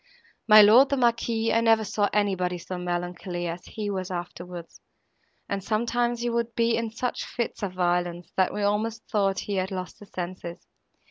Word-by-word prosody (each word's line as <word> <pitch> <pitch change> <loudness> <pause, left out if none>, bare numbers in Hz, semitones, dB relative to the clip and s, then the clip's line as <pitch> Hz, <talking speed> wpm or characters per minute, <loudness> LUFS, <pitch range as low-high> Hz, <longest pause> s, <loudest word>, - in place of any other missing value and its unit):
My 215 -1 +10
lord, 240 +7 +7
the 280 - +1
Marquis, 230 -2 +1
I 230 - +3
never 225 -1 +4
saw 205 0 0
anybody 190 -3 0
so 180 +1 -6
melancholy 175 0 -3
as 170 +1 -5
he 210 -2 -4
was 185 -2 -3
afterwards, 175 -1 -7 0.7
and 195 -1 -3
sometimes 235 +2 0
he 240 - 0
would 235 0 -1
be 230 -1 +2
in 230 -1 -1
such 240 +3 -3
fits 235 -1 -4
of 195 -3 -3
violence, 175 -1 -1
that 185 -1 +2
we 210 - -3
almost 215 +2 -1
thought 195 -2 +1
he 200 -1 -3
had 185 0 0
lost 185 -2 -6
his 205 - -14
senses. 175 -1 -6
205 Hz, 180 wpm, -26 LUFS, 180-230 Hz, 0.7 s, My